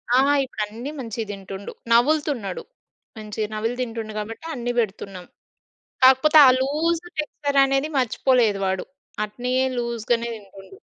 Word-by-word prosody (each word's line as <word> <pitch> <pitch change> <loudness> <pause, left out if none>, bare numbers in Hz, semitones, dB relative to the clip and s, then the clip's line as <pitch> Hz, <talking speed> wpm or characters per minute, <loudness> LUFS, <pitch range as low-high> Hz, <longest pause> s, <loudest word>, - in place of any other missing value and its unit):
ఆ! - - +6 0.3
ఇప్పుడు 230 -4 -4
అన్నీ 235 +7 -7
మంచిగా 225 -3 -5
తింటుండు. 195 0 -8 0.2
నములుతున్నాడు. 245 - +2 0.5
మంచిగా 215 0 -4
నమిలి 225 +3 -2
తింటుండు 225 -3 -4
కాబట్టి 225 +7 -7
అన్నీ 245 0 -2
పెడుతున్నాం. 195 -4 -4 0.8
కాకపోతే 265 +4 +6
ఆ - - +8
లూజ్ 320 +5 0 0.2
టెక్స్చర్ 285 -2 -1
అనేది 270 +2 0
మర్చిపోలేదు 245 -4 +2
వాడు. 190 0 -1 0.4
అట్లే 245 +4 -4 0.2
లూజ్‌ 235 -2 -3
గానే 235 0 +1
తింటుండు. 200 - -14
235 Hz, 125 wpm, -23 LUFS, 210-265 Hz, 0.8 s, ఆ